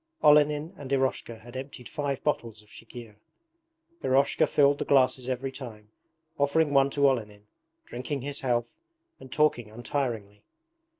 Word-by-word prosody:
Olenin 150 +2 +4
and 140 -2 -8
Eroshka 130 -4 -1
had 120 +2 -13
emptied 130 -2 -7
five 140 -2 -3
bottles 115 -7 -2
of 105 - -24
chikhir. 115 -2 -11 0.9
Eroshka 135 +2 +3
filled 145 0 +3
the - - 0
glasses 130 -2 +2
every 130 +1 -2
time, 110 -6 -10 0.5
offering 145 +1 +2
one 135 0 +5
to 140 0 +3
Olenin, 105 -6 -2 0.4
drinking 130 +3 -4
his 145 +2 -4
health, 120 - -1 0.4
and 130 - -13
talking 145 -7 +1
untiringly. 110 -3 -4
130 Hz, 135 wpm, -28 LUFS, 115-140 Hz, 0.9 s, one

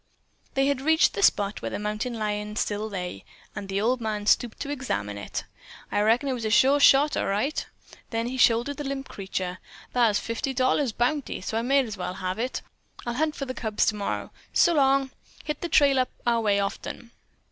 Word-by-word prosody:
They 270 0 +3
had 280 -2 +1
reached 320 +3 +4
the - - -3
spot 205 - +2
where - - -3
the - - -4
mountain 215 +3 -3
lion 210 -1 -3
still 215 0 -1
lay, 180 -3 -5 0.3
and 195 - -6
the 195 +1 0
old 240 +4 +1
man 215 -2 -2
stooped 230 +1 +2
to 285 - -3
examine 105 - -3
it. 100 - -5 0.5
"I 205 - +2
reckon 230 +6 +3
that 265 - 0
was 240 -2 -4
a 220 - 0
sure 270 +6 +5
shot, 285 +1 +6
all - - 0
right." 230 +10 0 0.5
Then 230 0 -1
he 250 +2 -3
shouldered 245 +3 +3
the 295 - -4
limp 275 -1 -4
creature. 185 -2 -4 0.3
"Thar's 230 -4 +4
fifty 230 +5 -3
dollars 255 0 +2
bounty, 250 +6 -1
so 210 - -4
I 225 - +1
might 270 +2 +3
as 215 -3 -6
well 180 0 -4
have 185 +3 -3
it. 250 +2 -2 0.4
I'll 240 - -2
hunt 305 +4 0
for 275 - -4
the 255 - -4
cubs 220 -4 0
tomorrer. 210 -2 -2 0.2
So 345 - +5
long. 275 -2 +3 0.3
Hit 300 -1 -4
the 345 - -3
trail 280 -4 +5
up 255 - +1 0.2
our 235 -1 +2
way 205 -2 +2
often." 200 +3 -4
235 Hz, 205 wpm, -26 LUFS, 210-270 Hz, 0.5 s, shot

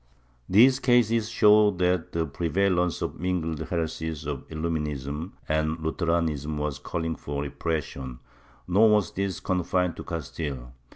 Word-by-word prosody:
These 125 +7 +6
cases 115 -3 +3
show 105 -2 +6
that 90 -3 0
the 85 -1 0
prevalence 90 +3 0
of - - -2
the - - -16
mingled 85 -3 -1
heresies 80 -2 -3
of 70 -3 -5
Illuminism 75 -1 -3
and 80 +1 0
Lutheranism 80 -2 -1
was 75 -1 -2
calling 80 +2 -3
for 70 -1 -4
repression, 70 -3 -4 0.5
nor 105 +5 +5
was 105 -4 +3
this 95 -1 -2
confined 90 -1 0
to - - -6
Castile. 70 -6 -5
80 Hz, 130 wpm, -26 LUFS, 75-90 Hz, 0.5 s, These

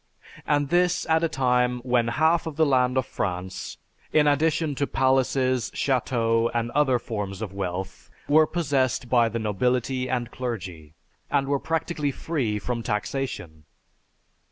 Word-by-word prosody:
And 145 -2 +1
this 180 +1 +2
at 160 +1 +2
a 165 - +2
time 125 -2 +1
when 120 -2 +1
half 160 +8 +2
the 160 0 +1
land 130 -2 +2
of 130 - +1
France, 95 -3 -4 0.3
in 150 -1 +4
addition 150 +1 +2
to 140 +1 -1
palaces, 130 -1 +1
chateaux, 115 -3 +1
and 115 0 -1
other 135 -3 +3
forms 105 -5 -5
of 105 -4 -5
wealth 95 -1 -5 0.2
were 155 +1 +5
possessed 135 -7 0
by 120 -2 +4
the 115 - -3
nobility 125 +4 0
and 120 -2 -2
clergy, 90 -11 -6 0.3
and 140 -1 +1
were 140 0 +1
practically 160 -1 -1
free 130 -8 -2
from 115 +3 -3
taxation. 105 - -4
125 Hz, 140 wpm, -25 LUFS, 115-145 Hz, 0.3 s, were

